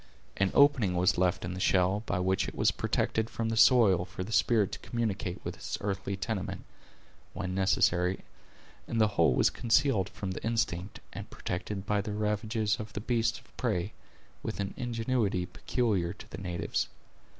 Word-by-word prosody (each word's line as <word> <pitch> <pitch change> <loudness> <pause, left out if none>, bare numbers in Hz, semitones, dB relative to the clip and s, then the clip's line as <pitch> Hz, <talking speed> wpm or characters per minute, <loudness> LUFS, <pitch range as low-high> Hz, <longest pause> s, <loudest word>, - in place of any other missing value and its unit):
An 100 -1 +2
opening 130 -10 +5
was 90 0 +3
left 90 -1 +1
in 90 - -4
the 90 - -5
shell, 95 +2 +2
by 100 - 0
which 95 +1 +1
it - - -7
was - - +3
protected 110 0 0
from 115 -1 -2
the 115 - -1
soil, 110 -6 +6
for 95 0 -6
the 105 - -8
spirit 110 -2 +3
to - - -6
communicate 100 -6 -2
with - - -4
its - - -4
earthly 100 -1 -3
tenement, 100 -1 -3 0.7
when 95 -2 -3
necessary; 95 -1 +2 0.7
and 115 - -1
the 110 -1 +5
whole 85 -10 +3
was - - +4
concealed 115 -4 +2
from 95 -2 -5
the 95 - -6
instinct, 110 -5 -1
and - - -7
protected 95 +2 -4
from 105 0 +1
the 105 +1 -4
ravages 105 0 0
of 105 -1 -7
the - - -3
beasts 115 +1 0
of - - -19
prey, 100 -5 -1 0.5
with - - -4
an 100 -1 -2
ingenuity 115 -6 0
peculiar 95 -5 -1
to - - -13
the - - -6
natives. 90 -3 -2
100 Hz, 175 wpm, -30 LUFS, 95-110 Hz, 0.7 s, soil